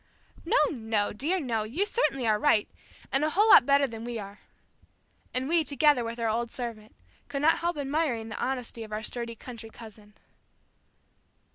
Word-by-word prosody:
"No, - - +2
no, 220 -5 -1
dear, 310 - -1
no; 235 -8 -1
you 255 - -1
certainly 285 - 0
are 215 -2 +2
right, 220 -7 +3 0.4
and 270 +2 +2
a 310 - +2
whole 410 +7 +3
lot - - +8
better 280 0 +5
than 225 -3 -7
we 240 0 -4
are." 200 -1 -8 0.9
And 255 +1 -2
we, 330 +1 +3
together 290 -3 +3
with 230 +1 -5
our 230 - 0
old 230 +2 -1
servant, 230 -4 -7 0.3
could 280 0 -4
not 325 +2 +4
help 345 -1 -1
admiring 275 -5 -1
the - - -4
honesty 250 -3 -3
of 215 - -11
our 215 +1 -4
sturdy 235 +1 -5
country 230 -1 -9
cousin. 215 -2 -14
240 Hz, 175 wpm, -28 LUFS, 220-290 Hz, 0.9 s, lot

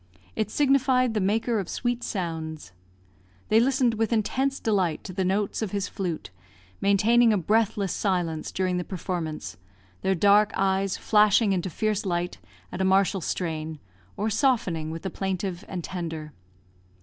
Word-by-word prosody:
It 215 -2 -1
signified 260 -3 +3
the 215 - 0
maker 220 +4 +1
of 190 - -4
sweet 240 0 -2
sounds. 160 - -4 0.8
They 220 - +5
listened 255 -1 +3
with 225 +1 -1
intense 265 +5 0
delight 190 -7 0
to 185 - -7
the 190 +1 -1
notes 195 +4 0
of 220 - -1
his 200 0 -2
flute, 170 - -4 0.5
maintaining 225 +4 +4
a 210 - +3
breathless 205 0 +1
silence 175 -5 -1
during 185 -1 0
the 180 - -1
performance; 160 - -4 0.4
their 190 0 +1
dark 205 +3 +4
eyes 195 0 +1
flashing 210 -1 +4
into 185 0 -1
fierce 215 +4 -1
light 175 -2 -2 0.3
at - - -4
a - - +2
martial 190 0 +3
strain, 160 -2 -3 0.4
or 215 +2 -1
softening 205 - +1
with 165 +1 -6
the 190 - -3
plaintive 190 -1 -3
and 180 -2 -5
tender. 160 -4 -5
195 Hz, 150 wpm, -26 LUFS, 175-220 Hz, 0.8 s, They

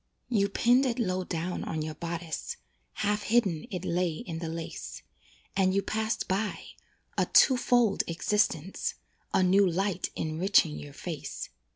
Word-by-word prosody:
You 200 -5 +2
pinned 245 +6 +4
it 235 - -1
low 185 -6 0
down 175 0 -3
on 160 -1 -3
your 155 0 -4
bodice, 170 0 -4 0.5
Half 210 +1 +1
hidden 205 -8 +1
it 180 -1 -4
lay 175 -1 +1
in 165 0 -6
the 165 -1 -4
lace, 165 0 -6 0.5
And 190 -1 +3
you 200 - +2
passed 220 +2 -1
by 200 +3 -2 0.5
"a - - +2
two 260 - +6
fold 245 -4 +3
existence," 170 0 0 0.4
A 190 - +3
new 190 +1 +5
light 190 +2 -1
enriching 155 - +2
your 75 -1 -9
face. - - -6
185 Hz, 150 wpm, -29 LUFS, 165-210 Hz, 0.5 s, two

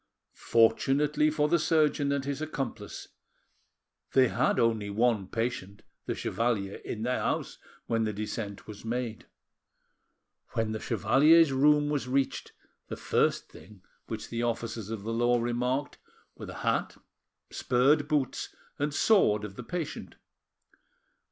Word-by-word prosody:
Fortunately 140 +7 +2
for 150 -1 +1
the 170 +2 +2
surgeon 150 -2 +2
and 140 -1 -1
his 140 +1 -3
accomplice, 140 -5 -5 1.0
they 130 -2 +5
had 125 - +1
only 110 -3 +1
one 110 -2 +1
patient—the 115 -4 -5
chevalier—in 110 -1 -2
their 125 +1 0
house - - -2 0.3
when 115 -1 0
the 110 - 0
descent 105 -1 -5
was 105 -2 -10
made. 115 -1 -4 1.3
When 110 -1 -1
the 110 - -3
chevalier's 140 - +4
room 145 +2 +4
was 145 -3 -1
reached, 135 +1 -1 0.4
the - - -6
first - - +1
thing 105 -3 -15 0.2
which 110 -1 -6
the 115 0 -3
officers 115 -2 -3
of 110 -3 -5
the 115 +2 -3
law 120 +1 +2
remarked 125 +4 -2 0.4
were - - -9
the - - -8
hat, - - 0 0.5
spurred 145 +4 +2
boots, 145 -5 -1 0.2
and 145 0 -1
sword 105 - +3
of 100 -2 -9
the - - -7
patient. 170 +4 -5
120 Hz, 130 wpm, -29 LUFS, 110-145 Hz, 1.3 s, they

